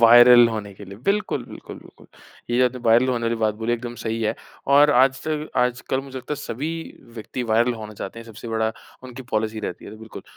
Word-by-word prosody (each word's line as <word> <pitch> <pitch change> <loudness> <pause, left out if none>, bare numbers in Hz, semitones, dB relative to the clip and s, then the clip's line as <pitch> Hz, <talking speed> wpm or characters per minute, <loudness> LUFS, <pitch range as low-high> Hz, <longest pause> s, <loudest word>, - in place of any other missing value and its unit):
Viral 120 +1 +8
होने 105 -3 -5
के 100 - -11
लिए 100 +1 -11
बिल्कुल, 210 +2 0
बिल्कुल, - - -10
बिल्कुल। - - -17 0.4
ये 120 - +1
जो 130 - +5
अपने 125 0 -1
वायरल 120 +3 +5
होने 120 -2 -1
वाली 115 0 0
बात 110 -1 +1
बोली 115 +2 -2
एकदम 120 0 -4
सही 115 0 -2
है। 105 - 0 0.4
और 145 +1 +7
आज 130 0 +4
तक 155 -1 -3
आज 125 0 +1
कल 130 - +1
मुझे 135 -1 -10
लगता 130 +3 -6
है - - -9
सभी 145 +4 -4 0.4
व्यक्ति 120 +2 -5
वायरल 120 +2 +3
होना 110 -1 -8
चाहते 100 +2 -7
हैं। 115 - -10
सबसे 115 +1 -10
बड़ा 110 0 0 0.3
उनकी 130 +1 -9
पॉलिसी 110 0 -1
रहती 90 -4 -6
है - - -9
तो 110 - -10
बिल्कुल। 110 0 -10
120 Hz, 230 wpm, -23 LUFS, 110-130 Hz, 0.4 s, वायरल